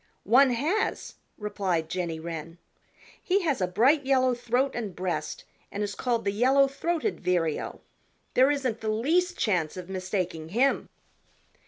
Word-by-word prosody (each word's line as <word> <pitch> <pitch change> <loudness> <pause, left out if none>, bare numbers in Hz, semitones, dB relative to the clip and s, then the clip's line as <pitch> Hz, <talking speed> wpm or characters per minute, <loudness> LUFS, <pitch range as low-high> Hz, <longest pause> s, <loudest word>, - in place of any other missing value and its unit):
"One 260 +6 +5
has," 320 - -1 0.2
replied 190 -6 -1
Jenny 170 -1 -3
Wren. 165 0 -6 0.6
"He 390 -1 +1
has 290 - 0
a 185 - +2
bright 265 - +3
yellow 260 -1 +3
throat 245 +3 0
and 215 -6 -4
breast 185 - -3 0.3
and 205 - -2
is 205 -1 -3
called 235 -1 -1
the 200 - +2
Yellow 265 +6 +4
throated 335 +8 -2
Vireo. 175 -4 -1 0.5
There 260 +2 +5
isn't 260 -6 -1
the 220 - -2
least 330 +12 +1
chance 180 -6 0
of 180 0 -7
mistaking 185 -4 -3
him." 250 +9 +1
225 Hz, 145 wpm, -27 LUFS, 180-275 Hz, 0.6 s, One